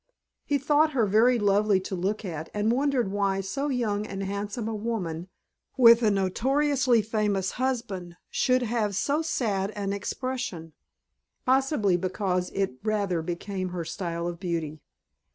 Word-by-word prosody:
He 290 - +1
thought 295 +3 +3
her 240 -5 +3
very 225 +5 +4
lovely 205 -1 +3
to 190 - -6
look 195 +4 -2
at 160 -3 -5
and 210 +2 +2
wondered 260 -5 +1
why 200 -1 0
so 235 +10 -3
young 215 -5 -1
and 195 -1 -5
handsome 200 +3 -3
a 225 - -2
woman 195 -7 -3 0.5
with 235 -2 +8
a 220 - +4
notoriously 250 +5 +2
faithful 210 -2 0 0.2
husband 200 -9 -3
should 255 -1 +2
have 220 -4 -1
so 285 - +1
sad 205 -11 -1
an 200 -1 -2
expression. 205 -6 -4 0.7
Possibly 260 - +2
because 185 0 -1
it 190 -10 -1
rather 200 -5 0
became 185 +3 -4
her 175 -2 -4
style 170 -1 -4
of 175 -1 -5
beauty. 165 -4 -3
205 Hz, 145 wpm, -27 LUFS, 185-245 Hz, 0.7 s, with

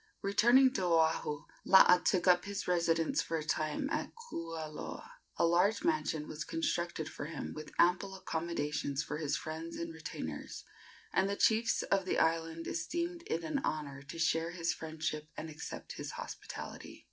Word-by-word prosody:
Returning 240 +6 +5
to 190 - -1
Oahu, 160 -3 +2 0.2
Laa 180 -2 +8
took 180 -1 +1
up 180 -1 +5
his 200 0 -4
residence 165 -2 +2
for 165 - -2
a 155 - -3
time 155 - -1
at 310 - -1
Kualoa. 165 - -6 0.3
A - - +4
large 180 +6 +3
mansion 310 - 0
was 155 0 -5
constructed 165 0 -1
for 145 - -6
him, 155 0 -5
with 155 0 -8
ample 185 +2 +3
accommodations 155 -5 -2
for 150 - -4
his 150 -3 0
friends 160 +2 -5
and 170 -1 -4
retainers, 160 -1 -6 0.5
and 195 - +3
the 200 - 0
chiefs 225 +2 +3
of 195 -1 +1
the - - 0
island 165 0 +1
esteemed 340 - -2
it 165 +1 -1
an 280 - -1
honor 145 -3 -3
to 140 +4 -9
share 165 0 +2
his 170 -1 -1
friendship 155 -1 -4
and 160 - -5
accept 155 - -7
his - - -5
hospitality. - - -7
165 Hz, 160 wpm, -33 LUFS, 155-190 Hz, 0.5 s, Laa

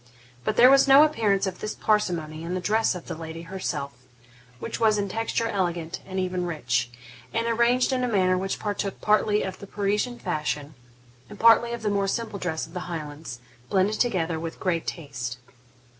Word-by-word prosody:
But 215 - -1
there 250 +2 +8
was 275 0 +6
no 275 +2 +9
appearance 215 -11 +2
of 185 -2 -4
this 215 - -4
parsimony 170 -7 0
in 170 +2 -3
the - - -1
dress 215 +2 +1
of 175 - -8
the - - -5
lady 160 +1 -7
herself, 165 -6 -4 0.6
which 225 - -5
was 220 -2 +4
in 200 -1 -1
texture 225 +3 -1
elegant, 175 -5 -2
and 190 0 -3
even 180 -1 -1
rich, 125 -7 -1 0.5
and 230 0 +1
arranged 235 +3 +2
in 255 -1 0
a - - +1
manner 185 -5 +2
which 190 +1 -2
partook 205 -2 -3
partly 210 0 +2
of 190 - -5
the 200 - -9
Parisian 210 +5 -1
fashion 150 - -3 0.6
and 205 - -11
partly 230 +1 +6
of 235 -1 -5
the 210 - +1
more 200 -1 +1
simple 215 -1 -3
dress 160 -3 -2
of 160 - -16
the 180 -1 -5
Highlands, 150 -6 -6 0.3
blended 200 +2 +1
together 175 -9 0
with 165 0 -6
great 170 -3 -1
taste. 125 -7 -5
190 Hz, 190 wpm, -25 LUFS, 165-220 Hz, 0.6 s, no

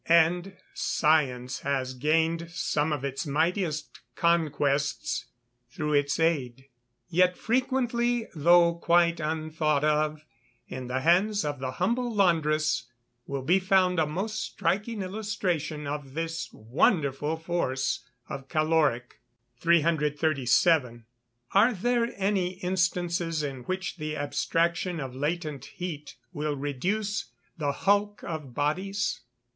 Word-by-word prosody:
And 175 +3 +3 0.2
science 130 -5 +1
has 130 -2 -1
gained 165 +5 +1
some 155 -3 -1
of 145 -2 -2
its 135 +3 -3
mightiest 160 +1 -1 0.2
conquests 145 -7 +1 0.4
through 150 +4 -2
its 145 0 +2
aid. 135 -5 0 0.4
Yet 180 +1 +3
frequently, 240 -1 0
though 170 +2 +5
quite 170 0 +3
unthought 155 -1 0
of, 155 0 +1 0.4
in 130 -1 -6
the 130 +1 -1
hands 195 +6 +3
of 145 -2 -3
the 130 0 -3
humble 235 - 0
laundress, 155 - +2 0.4
will 140 -1 -3
be 180 +7 +4
found 185 -1 +3
a 155 - +2
most 205 +8 -3
striking 205 +5 -1
illustration 185 -7 -2
of 140 -1 -5
this 165 -5 -3
wonderful 145 - +1
force 140 -7 -1 0.2
of 135 -1 -7
caloric. 155 -6 +1 0.4
337. 150 -5 +2 0.5
_Are 210 +1 +4
there 240 +2 +1
any 190 -2 0
instances 175 -3 0
in 135 -3 -4
which 185 0 -3
the 155 -1 -4
abstraction 170 +4 0
of 130 -3 -5
latent 150 0 -3
heat 155 -5 -7 0.2
will 150 -2 -2
reduce 180 - -2 0.3
the 145 -3 -1
hulk 205 +5 +1
of 150 -7 -6
bodies? 190 +7 -1
160 Hz, 115 wpm, -27 LUFS, 145-180 Hz, 0.5 s, though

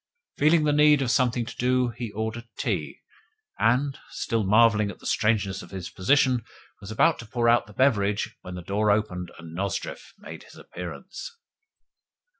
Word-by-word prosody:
Feeling 155 +2 +4
the 150 -1 +2
need 150 -1 +5
of 125 - 0
something 125 -2 +1
to 115 -1 -9
do, 125 0 +2
he 120 0 -6
ordered 110 +2 -4
tea, - - -3 0.6
and, 130 +4 +2
still 115 -2 -2
marvelling 105 +1 +4
at - - -8
the - - -17
strangeness 100 -3 +1
of - - -12
his 95 -3 -7
position, 130 +3 +2 0.4
was 100 - -10
about 110 - +2
to 115 - -9
pour 120 +1 0
out 120 0 +4
the 105 - -14
beverage 105 -5 +1
when 90 - -8
the 90 - -7
door 105 +4 0
opened 100 -4 0
and 85 -1 -11
Nozdrev 95 +1 -4
made - - -10
his - - -16
appearance. 190 - -8
115 Hz, 170 wpm, -26 LUFS, 100-125 Hz, 0.6 s, need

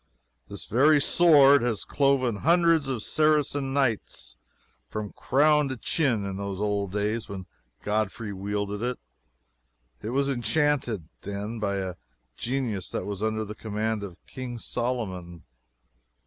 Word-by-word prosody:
This 100 - -8
very 145 +6 +4
sword 145 -3 +6
has 120 -3 -1
cloven 135 -5 +2
hundreds 165 - +3
of 125 -5 -2
Saracen 150 -3 +2
Knights 135 -6 -1 0.5
from 105 -2 -5
crown 150 +1 +3
to 130 - -4
chin 120 -7 +1
in 95 -1 -4
those 100 -1 -4
old 100 -2 -1
times 105 +2 -1
when 95 -2 -6 0.4
Godfrey 105 0 -2
wielded 100 +1 -3
it. 125 +1 -1 1.0
It 110 - -4
was 135 +3 +1
enchanted, 130 - 0
then, 100 +3 -5
by 100 -2 -1
a 95 -2 -3 0.4
genius 120 -7 -2
that - - -3
was 100 -1 -5
under 110 0 -1
the 105 - -6
command 110 0 -2
of 95 -3 -8
King 125 -2 -6
Solomon. 100 -9 -3
110 Hz, 135 wpm, -27 LUFS, 100-135 Hz, 1.0 s, sword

